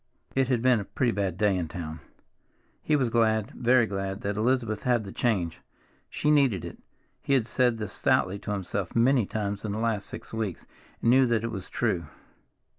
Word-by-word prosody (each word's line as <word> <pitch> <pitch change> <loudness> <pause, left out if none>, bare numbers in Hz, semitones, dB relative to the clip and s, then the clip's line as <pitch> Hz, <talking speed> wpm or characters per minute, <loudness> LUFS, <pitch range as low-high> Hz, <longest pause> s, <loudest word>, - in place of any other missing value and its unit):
It 135 -1 +2
had 125 -3 0
been 125 -3 +4
a - - -3
pretty 120 +4 0
bad 100 -5 -2
day 105 -1 +2
in 90 -3 -2
town. 80 -1 -6 0.8
He 155 - +1
was 130 -5 +1
glad, 110 -2 +2
very 125 0 +3
glad, 95 -1 -4
that 100 0 -2
Elizabeth 115 -1 0
had 120 -3 +1
the 100 - -8
change. 95 -10 -1 0.5
She 150 - 0
needed 135 - +3
it. - - -9 0.4
He 140 - +1
had 125 -5 +2
said 120 -1 +1
this 105 -3 -5
stoutly 95 +2 +1
to 105 - -5
himself 100 -2 -3
many 120 -2 +3
times 105 -2 -3
in 105 -2 -3
the - - -3
last 110 -3 -1
six - - -9
weeks, 110 -5 -3 0.4
and 115 - +5
knew 130 0 +5
that 115 -2 +1
it 115 - -2
was 95 -5 -6
true. 85 -3 -1
110 Hz, 195 wpm, -27 LUFS, 100-120 Hz, 0.8 s, and